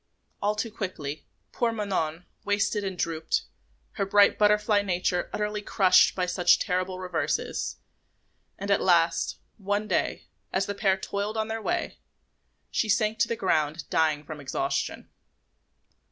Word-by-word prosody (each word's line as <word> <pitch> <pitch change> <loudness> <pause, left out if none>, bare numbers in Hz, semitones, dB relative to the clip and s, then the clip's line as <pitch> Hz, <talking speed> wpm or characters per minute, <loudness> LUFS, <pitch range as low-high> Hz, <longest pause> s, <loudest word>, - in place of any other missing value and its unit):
All 210 +1 +1
too 220 +1 -3
quickly, 170 -9 -5 0.2
poor 235 -1 0
Manon 180 -6 -2 0.2
wasted 205 +1 0
and 190 -2 -4
drooped, 160 -1 -1 0.5
her 195 - -2
bright 205 0 +5
butterfly 210 0 +3
nature 180 -2 -1
utterly 210 0 -2
crushed 195 -2 +4
by 185 - 0
such 180 -1 +4
terrible 185 0 -1
reverses; 185 -1 -2 0.8
and 200 +1 -3
at 200 - +3
last, 170 -2 +2 0.2
one 205 +1 -1
day, - - -1 0.3
as 190 +1 +1
the 200 - -3
pair 195 -1 +2
toiled 200 +3 -3
on 220 0 -1
their 225 0 -3
way, 350 +9 -2 0.7
she 220 - 0
sank 215 +1 +2
to 230 - +3
the 230 - -1
ground 155 -5 0
dying 155 -2 +2
from 155 0 -8
exhaustion. 135 +1 -2
195 Hz, 140 wpm, -27 LUFS, 175-210 Hz, 0.8 s, bright